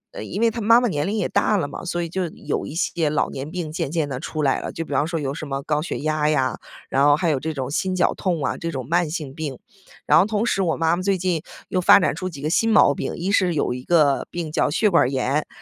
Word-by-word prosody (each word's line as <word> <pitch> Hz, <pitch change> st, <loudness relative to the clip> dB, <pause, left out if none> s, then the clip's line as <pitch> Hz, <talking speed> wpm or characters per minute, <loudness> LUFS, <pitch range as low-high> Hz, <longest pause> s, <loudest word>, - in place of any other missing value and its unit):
呃， -, -, -5 dB
因 205 Hz, -, -5 dB
为 230 Hz, -1 st, +4 dB
她 230 Hz, +1 st, -5 dB
妈 230 Hz, +3 st, +6 dB
妈 245 Hz, -, +1 dB
年 150 Hz, -7 st, -1 dB
龄 210 Hz, +3 st, -1 dB
也 210 Hz, -, 0 dB
大 210 Hz, -, +2 dB
了 170 Hz, -, -1 dB
嘛， 145 Hz, -, -8 dB
所 175 Hz, -1 st, -2 dB
以 -, -, -3 dB
就 185 Hz, +2 st, -2 dB
有 160 Hz, -, -4 dB
一 150 Hz, -, -8 dB
些 170 Hz, -3 st, 0 dB
老 150 Hz, -, 0 dB
年 135 Hz, +2 st, -6 dB
病 170 Hz, -2 st, -5 dB
渐 155 Hz, -, -3 dB
渐 160 Hz, -3 st, 0 dB
地 130 Hz, -3 st, -4 dB
出 155 Hz, +1 st, -4 dB
来 135 Hz, -, +2 dB
了， -, -, -5 dB
就 165 Hz, -, -5 dB
比 145 Hz, -, -6 dB
方 145 Hz, +3 st, +1 dB
说 165 Hz, 0 st, -2 dB
有 140 Hz, -2 st, -3 dB
什 155 Hz, 0 st, -6 dB
么 135 Hz, 0 st, -4 dB
高 150 Hz, +1 st, 0 dB
血 165 Hz, -, -4 dB
压 155 Hz, 0 st, +1 dB
呀， 135 Hz, -4 st, 0 dB, 0.3 s
然 135 Hz, -, +2 dB
后 145 Hz, 0 st, +6 dB
还 170 Hz, +2 st, 0 dB
有 140 Hz, -, 0 dB
这 160 Hz, +4 st, -3 dB
种 135 Hz, -2 st, -4 dB
心 185 Hz, +4 st, -1 dB
绞 180 Hz, -, +2 dB
痛 175 Hz, -6 st, -2 dB
啊， -, -, -1 dB
这 165 Hz, -, -4 dB
种 130 Hz, -5 st, -5 dB
慢 170 Hz, +1 st, +1 dB
性 150 Hz, -4 st, -5 dB
病。 145 Hz, -3 st, -5 dB, 0.5 s
然 -, -, +5 dB
后 -, -, +4 dB
同 215 Hz, +1 st, 0 dB
时 195 Hz, -4 st, +1 dB
我 170 Hz, -4 st, +1 dB
妈 165 Hz, 0 st, +2 dB
妈 180 Hz, -, -4 dB
最 195 Hz, 0 st, +1 dB
近 180 Hz, -3 st, -1 dB, 0.3 s
又 185 Hz, -, 0 dB
发 180 Hz, -, +7 dB
展 185 Hz, -, +1 dB
出 185 Hz, -, -4 dB
几 145 Hz, -6 st, -10 dB
个 155 Hz, -, 0 dB
新 225 Hz, +5 st, +2 dB
毛 180 Hz, -9 st, +6 dB
病， -, -, -4 dB
一 185 Hz, +3 st, -2 dB
是 185 Hz, -4 st, +2 dB
有 145 Hz, -, 0 dB
一 125 Hz, 0 st, -7 dB
个 150 Hz, -4 st, +2 dB
病 165 Hz, -3 st, -5 dB
叫 155 Hz, -, +1 dB
血 195 Hz, +8 st, +2 dB
管 170 Hz, -, +4 dB
儿 -, -, 0 dB
炎， 135 Hz, +2 st, -1 dB
160 Hz, 315 characters per minute, -22 LUFS, 145-185 Hz, 0.5 s, 发